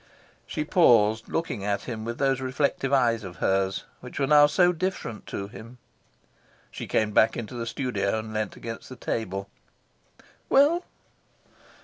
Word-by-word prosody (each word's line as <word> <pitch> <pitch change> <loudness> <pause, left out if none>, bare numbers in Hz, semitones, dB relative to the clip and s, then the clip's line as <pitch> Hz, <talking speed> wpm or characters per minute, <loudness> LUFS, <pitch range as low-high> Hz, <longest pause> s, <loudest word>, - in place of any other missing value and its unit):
She 150 - -2
paused, 115 - +4
looking 165 -11 -2
at 100 0 -1
him 110 -3 -5
with 115 0 -4
those 135 -2 +1
reflective 135 +1 -1
eyes 120 -5 +3
of 90 -2 -8
hers, 95 +3 0 0.2
which 125 +2 -8
now 145 +2 +5
were 145 - +8
so 175 +4 +4
different 175 - -4
to 100 - -4
him. 115 +3 -12 0.9
She - - -7
came 110 -1 +1
back 110 +2 +4
into 115 +1 -6
the 120 -1 -4
studio 110 -5 -1
and 110 0 -6
leaned 110 0 -3
against 115 -1 -7
the 130 - -8
table. 100 -5 -3 1.0
"Well?" 310 +6 +4
115 Hz, 150 wpm, -26 LUFS, 110-140 Hz, 1.0 s, were